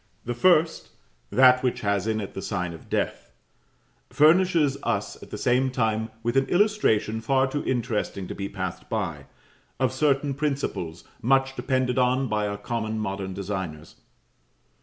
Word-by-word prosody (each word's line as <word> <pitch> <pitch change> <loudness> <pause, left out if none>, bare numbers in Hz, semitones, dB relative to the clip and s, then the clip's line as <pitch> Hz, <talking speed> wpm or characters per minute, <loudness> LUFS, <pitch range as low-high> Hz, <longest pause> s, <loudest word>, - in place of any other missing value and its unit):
The 120 - -2
first, 160 +5 +3 0.4
that 125 0 +6
which 125 -2 -1
has 100 -1 0
in 110 -1 0
it 100 - -6
the 95 - -5
sign 90 -4 -3
of 80 - -13
death, - - -2 0.8
furnishes 160 -2 +4
us - - -2
at - - -11
the - - -6
same 130 +2 +2
time 110 -3 0
with 120 +2 -1
an 135 0 +3
illustration 175 - +2
far 130 +3 +2
too 145 +2 -3
interesting 115 -6 -2
to - - -5
be 100 0 -5
passed 95 -3 -5
by, 85 -10 -3 0.5
of - - +1
certain 140 0 +1
principles 135 - -3 0.2
much 135 +2 +2
depended 130 -1 0
on 130 +1 +2
by 105 -2 0
our 100 0 -3
common 110 +1 -3
modern 95 -3 -3
designers. 95 -6 -5
120 Hz, 155 wpm, -25 LUFS, 100-135 Hz, 0.8 s, that